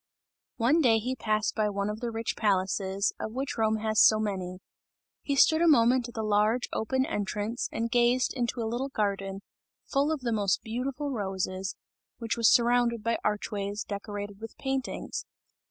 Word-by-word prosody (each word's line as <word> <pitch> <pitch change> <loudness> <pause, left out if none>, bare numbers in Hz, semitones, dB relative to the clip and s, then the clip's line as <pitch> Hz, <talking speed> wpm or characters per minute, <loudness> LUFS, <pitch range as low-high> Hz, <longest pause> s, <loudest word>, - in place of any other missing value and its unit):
One 265 +8 +3
day 235 -6 +5
he 250 +4 -2
passed 215 -3 0
by 215 -1 +1
one 200 0 -2
of 210 +1 -4
the 240 - -3
rich 225 0 -3
palaces, 195 -1 0
of 220 - -4
which 265 +2 -3
Rome 220 -1 +1
has 215 -1 +3
so 215 - +6
many; 190 -4 -3 0.6
he 280 - -1
stood 315 +4 +5
a 340 - +4
moment 245 -3 +4
at 240 - -12
the 220 - -2
large 215 +3 +2
open 260 +4 0
entrance, 210 +2 -2
and 230 0 -2
gazed 245 +1 +3
into 240 -1 -2
a - - -1
little 240 +5 -2
garden, 195 -4 -2 0.4
full 285 +2 +1
of 310 -4 -2
the 235 -2 -1
most 205 -3 +1
beautiful 265 +5 -3
roses, 190 -3 -3 0.4
which 230 -1 -2
was 230 -1 +4
surrounded 235 -1 +3
by 230 +1 0
archways, 205 0 -2
decorated 205 0 -6
with 225 - -9
paintings. 270 -1 -3
225 Hz, 170 wpm, -28 LUFS, 205-245 Hz, 0.6 s, so